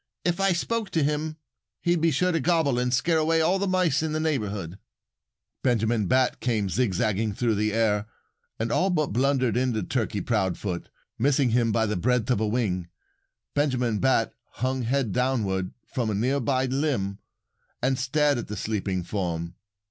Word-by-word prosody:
If 175 0 +1
I 195 0 +3
spoke 215 +4 -1
to 160 - +2
him 150 +2 -1 0.4
he'd 175 -1 +1
be 165 - +4
sure 180 +5 +1
to 165 - +1
gobble 160 -5 +2
and 125 0 0
scare 160 +6 +2
away 165 +1 +2
all 175 +4 +2
the 200 - 0
mice 180 -6 +2
in 160 -1 -2
the 155 - 0
neighborhood." 105 - -2 0.8
Benjamin 115 -4 +1
Bat 130 +2 +2
came 110 -5 0
zigzagging 110 -1 0
through 120 0 +1
the 105 +1 0
air 105 -1 +1 0.5
and 115 +1 -2
all 190 - +2
but 155 - 0
blundered 130 -1 +2
into 125 -3 0
Turkey 110 -5 -1
Proudfoot. 95 -4 -2 0.3
Missing 135 0 +3
him 115 -1 +2
by 110 +1 +2
the 105 -2 -1
breadth 125 +5 +1
of 125 - +2
a 110 - +1
wing, 105 -6 -1 0.7
Benjamin 125 -7 +1
Bat 130 -4 +2 0.2
hung 130 +1 -1
head 125 -1 0
downward 100 -6 0 0.2
from 120 -4 0
a 105 - -1
near 130 +7 +1
by 130 +1 +1
limb 130 -8 -1 0.6
and 130 +1 0
stared 145 +1 +2
at - - -6
the 105 - -5
sleeping 95 -4 -2
form. 85 -3 -3
125 Hz, 170 wpm, -26 LUFS, 105-145 Hz, 0.8 s, be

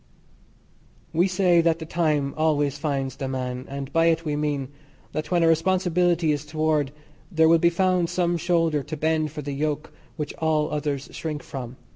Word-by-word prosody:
We 175 +4 +3
say 180 -2 +3
that 165 -1 +2
the 160 - -7
time 155 -4 0
always 145 -3 +1
finds 135 -4 -2
the 135 - -3
man, 130 -1 -4
and 140 0 -6
by 165 0 +4
it 165 0 +1
we 150 -1 -1
mean: 145 -3 -1 0.4
that 155 - -4
when 175 -2 +2
a - - +5
responsibility 175 -1 +2
is 145 -1 -1
toward 155 -2 0 0.4
there 160 -2 +4
will 165 0 +5
be 170 - +4
found 180 -1 +1
some 175 -1 +1
shoulder 165 -3 +1
to 155 +3 -6
bend 155 0 +1
for 150 0 -6
the 140 0 -4
yoke 150 +1 -2 0.2
which 150 -3 -4
all 155 -1 +1
others 145 -2 -2
shrink 155 -2 -5
from. 130 -2 -7
155 Hz, 180 wpm, -24 LUFS, 145-165 Hz, 0.4 s, a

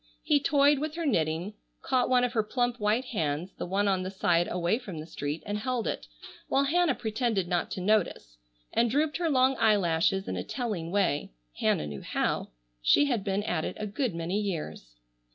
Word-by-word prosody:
He 290 - +3
toyed 285 -1 +4
with 310 +1 -3
her 335 -1 -3
knitting, 165 - 0 0.3
caught 255 -2 +1
one 250 -1 +4
of 250 0 0
her 225 - +3
plump 245 +2 -1
white 215 +5 +1
hands, 165 -5 -2
the - - -3
one 200 +3 +1
on 190 -2 +2
the 185 - -3
side 175 -3 +1
away 180 +5 0
from 195 -10 -8
the 155 - -6
street, 150 -1 -4
and 205 0 -2
held 250 0 -2
it, - - -3 0.4
while 275 - +2
Hannah 320 0 +2
pretended 220 -4 -1
not 175 -1 0
to 185 - -4
notice, 180 - 0 0.3
and 235 - +3
drooped 295 +5 +1
her 340 -1 0
long 260 -1 +3
eyelashes 195 -3 +2
in - - -2
a - - -3
telling 210 -11 -3
way. 170 - 0 0.3
Hannah - - +1
knew 75 -2 -6
how. - - -1 0.3
She 290 - +5
had 240 -8 0
been 195 +1 -1
at 170 -6 -1
it - - -4
a 215 - -2
good 215 - -2
many 170 +4 -1
years. 150 - -5
210 Hz, 200 wpm, -28 LUFS, 175-250 Hz, 0.4 s, She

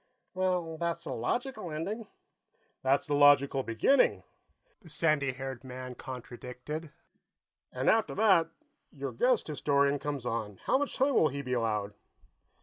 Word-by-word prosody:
"Well, 180 -4 -1
that's 170 0 -2
the - - -4
logical 220 - -2
ending." 195 +9 -4 0.7
"That's 135 +1 +2
the 150 - -2
logical 145 -1 +5
beginning," 125 - +2 0.6
the 170 - -15
sandy 150 -3 +1
haired 130 -1 -6
man 130 0 -7
contradicted. 125 +5 -7 0.8
"And 130 +1 -3
after 220 -1 +3
that, 190 -6 +4 0.4
your - - -5
guest - - +2
historian 140 -1 +1
comes 145 -3 -4
on; 110 -4 -3
how 265 - +2
much 290 - -2
time 275 +2 +2
will 160 - +5
he 140 +1 -5
be 125 -1 -3
allowed?" 105 -4 -1
145 Hz, 140 wpm, -30 LUFS, 130-175 Hz, 0.8 s, logical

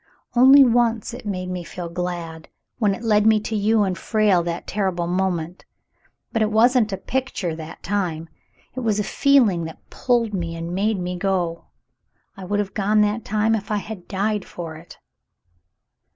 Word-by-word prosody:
Only 265 +3 +8
once 235 -1 +1
it 240 -3 -8
made 185 -2 -3
me 180 -1 -4
feel 175 0 -7
glad 170 -2 -5
— - - -51
when 205 -4 +2
it 235 - -11
led 210 -1 +3
me 220 -1 +5
to 220 - -4
you 215 +1 +2
and 190 -2 -1
Frale 210 -3 +2
that 170 0 -4
terrible 190 -4 -1
moment. 180 -1 -2 0.7
But 225 - 0
it 215 0 +1
wasn't 230 0 +4
a 195 - -2
picture 230 -6 -3
that 160 0 -10
time; 175 -5 -2 0.5
it 260 - -5
was 220 -4 0
a - - +1
feeling 225 - +3
that 160 - -11
pulled 235 -4 0
me 170 -3 -3
and 165 +1 -5
made 200 +2 0
me 180 0 -3
go. 175 -3 -1 0.7
I 195 - -9
would 205 +3 -1
have 205 -1 -2
gone 210 +1 +2
that 210 +2 0
time 215 +2 +1
if 205 -3 -2
I 210 - 0
had 205 -3 -7
died 205 +1 -1
for 165 -2 -8
it." 165 +2 -13
200 Hz, 180 wpm, -22 LUFS, 175-220 Hz, 0.7 s, Only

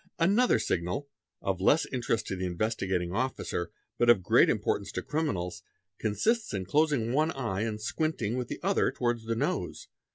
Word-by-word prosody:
P 165 - +1
Another 225 +7 +4
signal, 90 +12 -2 0.3
of 95 -1 -1
less 145 +11 +4
interest 120 -4 -1
to - - -3
the 95 0 -2
Investigating 95 -2 -1
Officer 115 -6 -2 0.3
but 120 - +4
of 110 -6 +6
great - - +5
importance - - 0
to - - -3
criminals, 100 - -2 0.4
consists 215 - 0
in 95 -1 -3
closing 140 - +2
one 155 +3 +3
eye 115 -7 -2
and 110 -1 -2
squinting 120 -1 -1
with 125 -1 -2
the - - -5
other 195 +1 +2
towards 120 -2 -1
the 115 0 -1
nose. - - -2
115 Hz, 170 wpm, -29 LUFS, 95-145 Hz, 0.4 s, of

